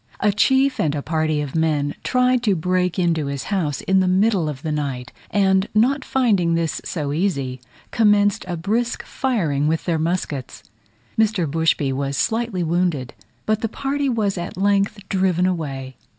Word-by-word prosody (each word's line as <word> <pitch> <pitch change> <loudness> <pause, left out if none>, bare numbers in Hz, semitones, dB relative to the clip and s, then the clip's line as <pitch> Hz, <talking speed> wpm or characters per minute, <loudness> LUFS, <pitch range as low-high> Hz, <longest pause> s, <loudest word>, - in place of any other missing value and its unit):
A 210 - +3
chief 265 +6 +2
and 150 -2 +1
a 145 - -3
party 155 -1 0
of 145 -3 -5
men 150 -3 +1
tried 250 -1 +2
to 210 -5 +2
break 180 +1 0
into 165 -5 +1
his 140 -1 -3
house 155 -8 -1
in 190 0 +2
the 185 - +2
middle 190 -3 +2
of 145 0 -7
the 160 - -2
night, 135 -4 -3 0.2
and 190 -1 +2
not 260 +6 +3
finding 200 -10 +2
this 165 -1 -1
so 145 -4 -3
easy, 140 -8 -1 0.3
commenced 205 -2 +3
a 175 -2 -3
brisk 225 +8 -1
firing 165 - -1
with 160 +1 -1
their 165 -3 0
muskets. 160 -5 -3 0.6
Mr. 215 -5 +2
Bushby 155 -2 +1
was 140 +1 -2
slightly 225 -5 0
wounded, 165 -6 0 0.3
but 215 0 0
the 225 - -1
party 275 +3 -1
was 210 -6 0
at 175 - -6
length 200 +1 +2
driven 185 -2 +1
away. 135 -7 -3
180 Hz, 165 wpm, -21 LUFS, 150-205 Hz, 0.6 s, A